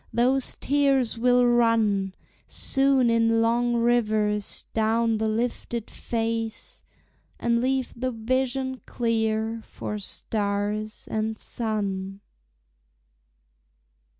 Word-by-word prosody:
Those 255 +2 +1
tears 275 -4 +2
will 245 +1 +4
run 225 -5 +2 0.3
Soon 270 -3 +2
in 230 0 +3
long 240 +1 +2
rivers 215 -3 +1
down 225 0 +2
the 220 0 +1
lifted 235 0 -2
face, 225 -1 -3 0.6
And 235 0 +1
leave 260 0 0
the 255 +2 -2
vision 260 +2 -1
clear 225 -1 0
for 210 - -6
stars 205 +1 -2
and 220 0 -1
sun. 200 -4 -3
230 Hz, 90 wpm, -25 LUFS, 215-245 Hz, 0.6 s, will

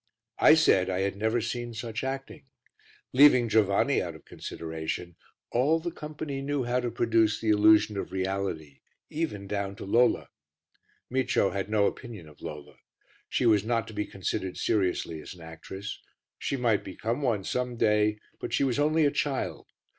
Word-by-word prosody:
I - - +8
said 95 - +4
I 95 0 0
had 100 0 -1
never 110 +3 +1
seen 120 +1 -4
such 115 0 -4
acting; 135 0 -5 0.7
leaving 130 -3 +7
Giovanni 105 -3 +3
out - - -5
of - - -15
consideration, 80 +1 -5 0.4
all 140 +7 +3
the 170 +1 -4
company 150 -3 -6
knew 140 -1 -1
how 120 +1 0
to 125 -1 -2
produce 115 -2 +2
the 110 - -1
illusion 105 0 +5
of 95 - -4
reality 95 -6 -3 0.3
even 150 -11 -3
down 100 0 -3
to - - -8
Lola. 120 +5 +3 0.8
Micio 130 -6 +2
had 100 0 -3
no 105 -1 +3
opinion 110 -10 -5
of 75 - -17
Lola. 75 -1 -8 0.5
She - - 0
was 105 -4 +4
not 115 0 0
to - - -9
be 105 0 -2
considered 95 -1 -3
seriously 90 -6 0
as - - -9
an 85 - -15
actress; 80 +5 -8 0.4
she 140 - -2
might 115 -5 +1
become 115 +7 -3
one 115 -8 0
some 125 +3 -2
day, 105 -1 +3 0.2
but - - -5
she - - +2
was 135 0 +1
only 155 +1 +3
a 145 - +3
child. 140 -2 -2
110 Hz, 170 wpm, -28 LUFS, 95-125 Hz, 0.8 s, I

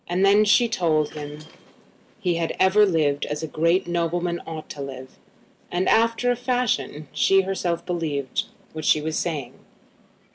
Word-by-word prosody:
Then 195 +4 +4
she 235 +3 +4
told 160 -8 0
him 150 0 -8 0.8
he 180 -5 0
had 165 -1 -2
ever 195 +3 +5
lived 150 -5 +1
as 150 +1 -4
a - - -2
great 165 +5 +1
nobleman 175 0 -1
ought 160 -1 -7
to 145 - -7
live. 130 -1 -7 0.6
And, 180 +2 0
after 230 +2 +3
a - - +1
fashion, 240 - -1
she 195 0 +3
herself 185 -3 -2
believed 155 -7 -2 0.3
what 155 0 -6
she 150 - +4
was 155 +1 -3
saying. 150 -8 -3
170 Hz, 150 wpm, -23 LUFS, 150-195 Hz, 0.8 s, ever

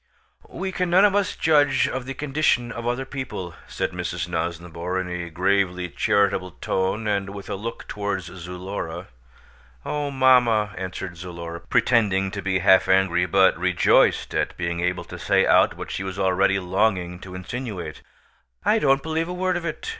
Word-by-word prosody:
"We 190 0 -4
can 180 -1 -1
none 185 +4 +6
of 205 - +3
us 200 -1 +1
judge 145 -3 +3
of 130 -1 -4
the 135 - -5
condition 135 -4 +1
of 115 0 -5
other 125 +2 -1
people," 130 -11 -6
said - - -3
Mrs. 85 -1 -4
Nosnibor 85 +1 -3
in 95 - -3
a 90 -1 -4
gravely 90 +1 0
charitable 100 -3 +1
tone 95 +4 -1
and 100 -2 0
with 100 - -8
a - - -1
look 115 +4 -6
towards 100 -3 -3
Zulora. 90 0 -6 0.8
"Oh, 145 -1 -2
mamma," 125 -6 +4
answered 95 -1 -6
Zulora, 85 -1 -7
pretending 95 -5 +2
to 100 - -5
be 95 -1 0
half 95 - +6
angry 90 -2 +3
but 95 +2 +4
rejoiced 90 -1 +3
at - - -1
being 85 -1 -2
able 90 +1 -1
to - - -10
say - - +3
out - - +4
what - - -7
she - - -3
was 95 -1 -5
already 95 +1 +2
longing 90 -1 0
to 90 -1 -10
insinuate; 95 -5 -6 0.6
"I - - +4
don't 135 -1 +3
believe 160 +1 -1
a 180 - -4
word 185 0 0
of 175 -1 -3
it. 160 - -5
95 Hz, 170 wpm, -24 LUFS, 90-125 Hz, 0.8 s, none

